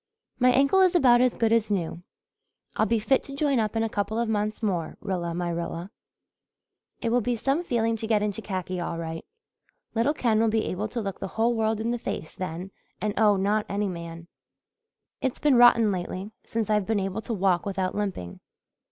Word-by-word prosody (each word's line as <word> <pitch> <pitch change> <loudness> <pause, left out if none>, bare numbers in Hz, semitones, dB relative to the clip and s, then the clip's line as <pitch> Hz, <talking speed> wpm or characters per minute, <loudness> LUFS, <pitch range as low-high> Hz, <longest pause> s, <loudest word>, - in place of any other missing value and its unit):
"My 250 0 +5
ankle 275 +9 +4
is 370 -1 +4
about 245 -7 +6
as 255 -1 +3
good 225 -1 +2
as 225 -2 +2
new. 175 -4 -2 0.7
I'll - - +2
be 230 - +2
fit 245 +5 +2
to 275 - -8
join 280 -3 +1
up 215 0 -1
in 225 - +1
a - - +1
couple 215 0 -2
of 235 0 0
months 215 0 -1
more, 180 -6 -1
Rilla 175 -4 -3
my 175 0 -2
Rilla. 170 +2 -4 1.1
It 230 - +1
will 245 +1 +3
be 240 +2 0
some 275 +8 0
feeling 230 -6 0
to 220 - -4
get 215 -2 +2
into 210 +1 -2
khaki 185 -3 -4
all 170 -1 -3
right. 165 0 -5 0.7
Little 235 +7 +1
Ken 225 -6 +2
will 225 - +3
be 220 0 +1
able 205 +4 -2
to 235 +2 -4
look 195 -2 -5
the - - -4
whole 230 +2 +3
world 220 -1 0
in 225 +2 -1
the 240 - -2
face 160 - -5
then 185 +1 -5 0.3
and 210 -1 -1
owe 210 -2 +4
not 205 +2 0
any 205 +1 -1
man. 170 -2 -7 0.9
It's 260 - -1
been 290 -3 +4
rotten 235 -3 +6
lately, 185 +2 -4
since 225 -2 -2
I've 210 -2 +1
been 220 -2 +1
able 195 +2 -3
to 230 - -4
walk 190 -1 +1
without 190 -2 -1
limping. 190 - -4
215 Hz, 205 wpm, -26 LUFS, 185-230 Hz, 1.1 s, about